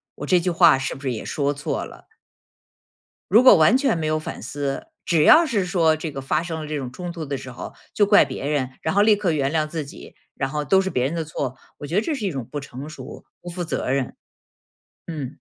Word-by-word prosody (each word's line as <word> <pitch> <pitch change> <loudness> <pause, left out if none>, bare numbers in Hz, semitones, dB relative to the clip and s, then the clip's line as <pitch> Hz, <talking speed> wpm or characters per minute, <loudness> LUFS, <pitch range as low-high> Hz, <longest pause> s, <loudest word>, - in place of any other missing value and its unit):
我 - - -6
这 180 - +3
句 175 +1 -1
话 170 -5 +5
是 135 - -3
不 135 - -12
是 135 -2 -2
也 110 - -6
说 145 -1 -1
错 145 0 -3
了？ - - -14 1.3
如 230 +4 +7
果 260 - +9
完 165 +10 +5
全 270 -9 +1
没 155 -1 -2
有 155 0 0
反 155 - -7
思， 140 - -4 0.2
只 165 -4 +3
要 330 - +7
是 220 - 0
说 170 -4 +2
这 155 0 -5
个 135 - -6
发 155 +4 -1
生 165 -2 -5
了 155 - -6
这 155 - -4
种 130 -3 -5
冲 175 +5 -6
突 165 -2 -6
的 140 -1 -3
时 130 - -9
候， 120 - -8 0.2
就 205 - +3
怪 205 0 +6
别 - - -6
人， 140 -3 -1
然 160 - -1
后 200 - +4
立 215 0 +5
刻 200 -4 0
原 140 -2 0
谅 155 -1 +1
自 155 -1 -4
己， 135 - -12 0.2
然 135 - -2
后 150 +1 -3
都 190 +7 +4
是 190 - -2
别 125 -7 0
人 150 +5 -2
的 165 - -1
错， 140 -4 -4 0.2
我 145 - -8
觉 165 - -4
得 205 - +4
这 320 - -2
是 270 -8 -3
一 - - -2
种 135 -5 -5
不 145 - -3
成 140 +1 -9
熟， 155 - -10 0.2
不 175 - -8
负 175 +1 -4
责 160 - -3
任。 135 -1 -1 0.9
嗯。 145 -5 -6
155 Hz, 270 characters per minute, -22 LUFS, 140-180 Hz, 1.3 s, 果